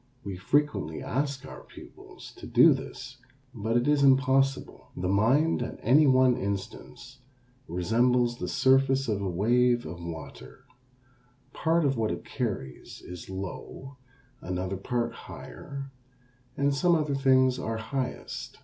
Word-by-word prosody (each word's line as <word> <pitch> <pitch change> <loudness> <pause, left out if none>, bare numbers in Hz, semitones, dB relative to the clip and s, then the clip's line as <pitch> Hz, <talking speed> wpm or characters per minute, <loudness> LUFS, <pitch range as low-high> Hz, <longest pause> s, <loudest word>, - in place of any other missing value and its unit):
We 100 -2 -5
frequently 115 - 0
ask 140 +1 -2
our - - -10
pupils - - -13
to - - -9
do - - +6
this, 130 +2 -8 0.4
but 115 0 -1
it 120 - 0
is 150 -1 +3
impossible. 135 0 +2
The 90 - -2
mind 125 - +2
at 120 - -5
any 145 +6 +5
one 130 -1 +5
instant 120 +4 -6 0.5
resembles 120 +6 +1
the - - -3
surface 135 0 +3
of 105 -3 -1
a 100 - -2
wave 120 +6 +2
of 85 +2 -8
water, 80 - -9 0.9
part 165 0 +1
of 135 -2 +1
what 110 -1 0
it - - -5
carries 95 - -5
is 90 -1 -9
low, 100 +8 -7 0.4
another 90 +1 -3
part 120 +5 -2
higher, 140 -1 -9 0.7
and 140 0 +2
some 170 +5 +3
other 150 -3 0
things 130 -1 +3
are 115 -3 -3
highest. 125 +3 -5
125 Hz, 135 wpm, -27 LUFS, 100-135 Hz, 0.9 s, do